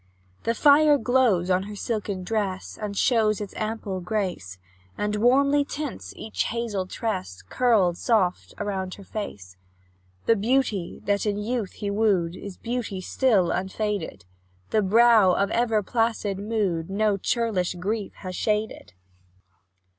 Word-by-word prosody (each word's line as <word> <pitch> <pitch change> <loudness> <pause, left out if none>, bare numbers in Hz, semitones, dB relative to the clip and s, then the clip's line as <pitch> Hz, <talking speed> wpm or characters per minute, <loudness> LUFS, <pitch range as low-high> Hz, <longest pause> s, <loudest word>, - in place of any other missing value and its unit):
The 230 - +1
fire 295 +2 +6
glows 225 -7 +2
on 180 0 +3
her 210 - -7
silken 205 -3 -3
dress, 195 -2 -2
And 205 -1 -4
shows 220 -4 +3
its 205 -2 -6
ample 215 -3 -3
grace, 180 - -3 0.4
And 210 0 -1
warmly 280 +5 +4
tints 290 -1 -6
each 220 - -3
hazel 220 -5 -2
tress, 95 - -4
Curled 210 -9 +3
soft 195 -7 0
around 190 -2 -3
her 200 - -12
face. 100 - -7 0.7
The 230 - +4
beauty 220 -4 0
that 205 +1 +1
in 205 -1 0
youth 215 -1 -2
he 200 -1 -4
wooed, 195 -5 +1
Is 195 -1 -8
beauty 235 -5 -3
still, 200 -2 +2
unfaded; 190 - -3 0.5
The 215 - +3
brow 215 -1 +5
of 200 0 0
ever 225 -3 +1
placid 225 -3 -1
mood 200 -6 -1
No 210 +1 +1
churlish 200 -4 0
grief 200 +3 -3
has 185 -2 -7
shaded. 210 - -2
210 Hz, 135 wpm, -25 LUFS, 185-230 Hz, 0.7 s, fire